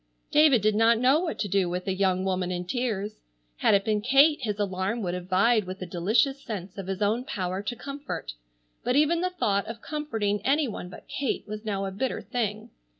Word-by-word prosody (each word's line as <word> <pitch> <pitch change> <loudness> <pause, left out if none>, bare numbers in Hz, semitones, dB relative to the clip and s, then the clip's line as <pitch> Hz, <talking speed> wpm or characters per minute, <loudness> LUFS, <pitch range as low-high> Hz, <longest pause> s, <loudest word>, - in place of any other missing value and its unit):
David 295 -7 +5
did 215 0 +4
not 225 +2 +4
know 260 +6 +4
what 345 -2 -3
to 205 - -1
do 190 -2 +1
with 180 +2 -4
a 190 - +1
young 185 -1 +1
woman 185 -1 0
in 180 0 -3
tears. 215 -1 -2 0.4
Had 205 - +4
it 195 0 +1
been 215 -2 +1
Kate 275 +6 +5
his 210 -4 -2
alarm 200 +3 -1
would 175 -2 -2
have 180 0 -5
vied 210 +3 +3
with 185 +1 -6
a 185 - -4
delicious 215 - +1
sense 195 -7 -6
of 190 - -6
his 195 +1 -2
own 220 +4 +1
power 190 - -3
to 205 +4 -4
comfort, 275 - -6 0.5
but 250 - +1
even 305 +4 +3
the 365 - +1
thought 205 - 0
of 230 0 -6
comforting 225 -10 -2
any 285 +2 +2
one 190 -5 -6
but - - -12
Kate 275 -4 -2
was 215 +1 -6
now 195 -2 -1
a 195 - -3
bitter 245 +7 -2
thing. 220 -1 -3
210 Hz, 215 wpm, -27 LUFS, 190-250 Hz, 0.5 s, David